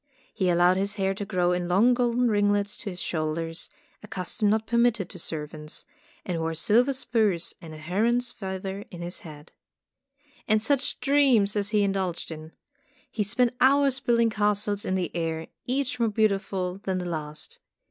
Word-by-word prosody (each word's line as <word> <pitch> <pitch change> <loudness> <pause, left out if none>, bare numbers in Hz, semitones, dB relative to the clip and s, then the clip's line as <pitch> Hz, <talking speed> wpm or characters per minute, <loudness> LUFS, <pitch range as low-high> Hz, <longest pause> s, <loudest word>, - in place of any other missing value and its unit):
He 190 -4 +1
allowed 175 +1 +4
his 200 +2 -1
hair 195 -1 0
to 205 +1 -5
grow 180 -3 +1
in 180 0 -1
long 205 +8 +4
golden 245 0 +2
ringlets 205 -1 +2
to 210 - -5
his 180 -2 -6
shoulders, 165 0 -2 0.3
a 210 - -11
custom 200 +2 -1
not 220 +1 +1
permitted 235 -5 +1
to 180 - -9
servants, 150 -1 -5 0.4
and 175 -3 -2
wore 165 0 -2
silver 230 - +3
spurs 220 -9 0
and 165 -3 -10
a 155 - -9
heron's 225 +10 0
feather 190 0 -5
in 175 -2 -8
his 175 +2 -5
hat. 150 -1 -12 1.0
And 215 0 +4
such 275 +5 0
dreams 265 -8 +4
as 205 0 0
he 210 -1 +2
indulged 190 -4 -1
in! 155 0 -9 0.6
He 220 - -2
spent 235 +5 +2
hours 275 0 +4
building 235 -2 +2
castles 205 -1 0
in 185 - 0
the 180 -2 -2
air, 165 -1 -2 0.2
each 255 0 -1
more 230 -1 +2
beautiful 195 -3 0
than 190 -2 -2
the 180 - -3
last. 155 -3 -5
200 Hz, 170 wpm, -26 LUFS, 175-225 Hz, 1.0 s, allowed